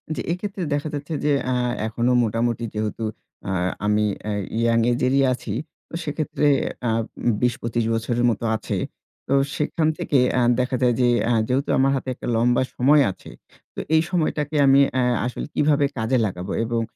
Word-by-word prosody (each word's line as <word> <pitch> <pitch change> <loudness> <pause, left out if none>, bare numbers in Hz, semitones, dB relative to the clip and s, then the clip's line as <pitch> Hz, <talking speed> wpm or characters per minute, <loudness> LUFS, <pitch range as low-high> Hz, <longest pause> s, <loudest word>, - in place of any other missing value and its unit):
জি, - - -3
এই - - +1
ক্ষেত্রে 200 -2 -4
দেখা 145 +2 -1
যাচ্ছে 145 +2 -5
যে 150 - +3
অ্যা 130 - 0 0.3
এখনো 120 +3 0
মোটামুটি 115 +1 -1
যেহেতু 110 +1 -3 0.4
অ্যা 95 - -2 0.3
আমি 105 0 +2 0.2
অ্যা 105 -1 -3 0.3
ইয়াং 115 0 +3
এজেরই 130 +2 +2
আছি। 110 -4 -5 0.4
তো - - -22
সেক্ষেত্রে 150 0 -2 0.4
আ - - +2 0.4
উম 120 - +4
২০-২৫ 115 -1 0
বছরের 120 +2 0
মতো 115 0 -2
আছে। 110 - -3 0.5
তো - - 0 0.2
সেইখান 155 +1 0
থেকে 140 - 0 0.2
অ্যা 125 - +2 0.2
দেখা 125 +1 0
যায় 125 -1 +4
যে 125 - +4 0.2
অ্যা 120 - +2
যেহেতু 135 +3 0
আমার 135 +1 +3
হাতে 130 0 -3
একটা - - -8
লম্বা 120 +2 +3
সময় 145 +4 +5
আছে, - - -13 0.5
তো - - -5 0.2
এই 160 - +5
সময়টাকে 155 -3 -1
আমি 135 0 +6
অ্যা 130 - +1 0.2
আসলে 125 - -4
কিভাবে 145 -1 +3
কাজে 115 +3 +1
লাগাবো 90 -3 -4
এবং 115 0 -1
125 Hz, 175 wpm, -23 LUFS, 115-145 Hz, 0.5 s, আমি